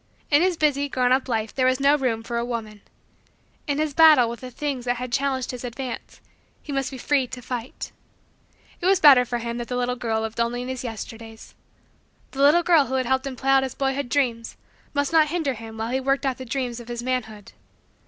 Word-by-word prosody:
In 290 +2 +5
his 365 -1 +2
busy, 285 -2 +1
grown 250 -2 +1
up, 260 +1 +2
life 220 -2 -1
there 255 -1 +2
was 255 +1 +2
no 280 +1 +4
room 245 -6 -1
for 235 0 -3
a - - -1
woman. 225 -3 -5 0.9
In 285 -1 0
his 305 -1 -1
battle 305 -6 +7
with 235 0 -6
the 255 - -8
things 265 -1 -4
that 245 0 -2
challenged 265 -1 -1
his 250 -1 -8
advance, 250 0 -6 0.4
he 295 - -7
must 270 -1 -1
be 265 - -8
free 270 0 +1
to 250 - -8
fight. 245 0 -6 0.9
It 355 - 0
was 385 -2 +4
better 270 -5 +7
for 240 0 -2
him 235 0 -4
that 240 - -5
the 250 - -3
little 250 0 0
girl 225 -2 -1
lived 220 +1 -5
only 240 +1 0
in 250 - -6
his 260 -1 -4
Yesterdays. 225 -1 -8 0.8
The 275 - -4
little 300 +5 +5
girl 330 -5 +4
who 260 - -2
had 260 -1 0
helped 265 +2 0
him 265 - -5
play 270 +2 0
out 270 0 +6
his 265 -2 -4
boyhood 270 -1 -1
dreams 240 -4 -1 0.4
must 285 +1 0
not 315 -2 +5
hinder 310 -4 -1
him 225 -1 -10
while 225 +2 -3
he 260 - +1
worked 275 +1 0
out 265 -1 -1
the 260 - -6
dreams 245 -1 -3
of 235 - -11
his 240 0 -5
manhood. 220 -5 -4
255 Hz, 225 wpm, -24 LUFS, 235-275 Hz, 0.9 s, battle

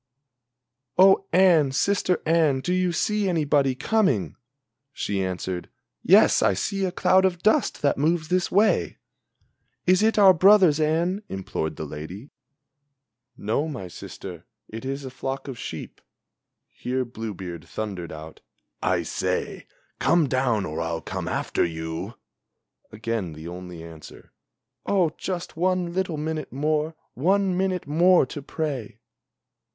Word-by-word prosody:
"Oh 195 +1 +6
Anne, 170 -6 +5
sister 185 +3 +1
Anne, 155 -5 +3
do 180 +6 -1
you 185 -1 +1
see 210 +3 0
anybody 145 -5 +2
coming?" 130 - +1 0.6
She 100 -7 -2
answered: 90 -1 -4 0.3
"Yes - - +5
I 95 - +3
see 195 - -1
a 185 - -1
cloud 185 +1 +3
of 180 -2 0
dust 215 -6 +2
that 140 -1 +2
moves 155 +1 +1
this 180 0 +1
way." 210 +3 +2 0.9
"Is 185 +2 +4
it 220 +1 +2
our 195 -2 +8
brothers, 185 -3 +5
Anne?" 165 +6 +1
implored 95 -4 -4
the 80 - -5
lady. 85 - -8 1.1
"No, 115 +9 -1
my 125 - -6
sister, 90 +1 -9 0.2
It 115 +4 -8
is 135 +1 -4
a 130 - -6
flock 135 +1 -5
of 130 -4 -7
sheep." - - -7 0.7
Here 130 +1 -3
Blue 115 -3 -6
beard 90 -2 -7
thundered 100 -6 -5
out: 80 +1 -10 0.4
"I - - +1
say, - - -3 0.3
Come 170 -4 +3
down 125 -6 +1
or 75 +1 -4
I'll 80 0 -3
come - - -5
after - - -1
you!" 80 +5 -4 0.8
Again 110 -5 -3
the 80 +2 -9
only 90 -1 -8
answer: 80 -2 -13 0.5
"Oh, 180 -5 +2
just 180 -2 -4
one 180 0 0
little 180 -3 -1
minute 155 +1 -4
more, 155 +3 -1 0.2
one 190 +6 +1
minute 185 -1 -1
more 170 +3 +4
to 145 +3 -7
pray!" 140 -6 -4
145 Hz, 135 wpm, -24 LUFS, -, 1.1 s, our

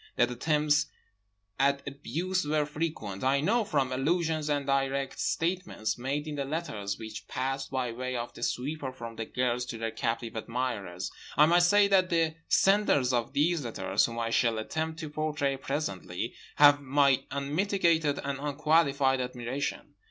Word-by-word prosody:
That 120 0 +2
attempts 150 +3 +2 0.7
at 140 +1 +2
abuse 165 +7 -2
were 150 0 +1
frequent 150 -10 -4
I 135 +2 +3
know 220 +10 +2
from 140 -9 0
allusions 155 +3 0
and 145 -1 0
direct 135 0 0
statements 165 - -1
made 135 +4 -3
in 155 - -4
the 140 - -1
letters 135 -9 -3
which 110 -1 -8
passed 135 +1 -3
by 130 -3 -1
way 130 +2 -4
of 120 0 -4
the - - -12
sweeper 135 +3 -2
from 115 -3 -8
the 115 - -4
girls 125 +1 -1
to 120 -2 -6
their 115 0 -3
captive 115 0 -3
admirers. 110 -6 -3 0.3
I 150 - +8
might 175 +2 +5
say 200 +4 +5
that 185 -2 +4
the 165 -2 +2
senders 195 -11 +3
of 120 -2 0
these 160 +1 +2
letters, 115 -2 +1
whom 115 0 -7
I 115 -1 -1
shall 115 -1 +2
attempt 160 +8 -3
to 155 - -5
portray 150 -2 -1
presently, 115 - -3 0.2
have 145 0 +7
my 140 -1 +3
unmitigated 160 +1 +1
and 140 -1 -3
unqualified 145 -2 +2
admiration. 125 +2 -4
140 Hz, 160 wpm, -29 LUFS, 125-155 Hz, 0.7 s, I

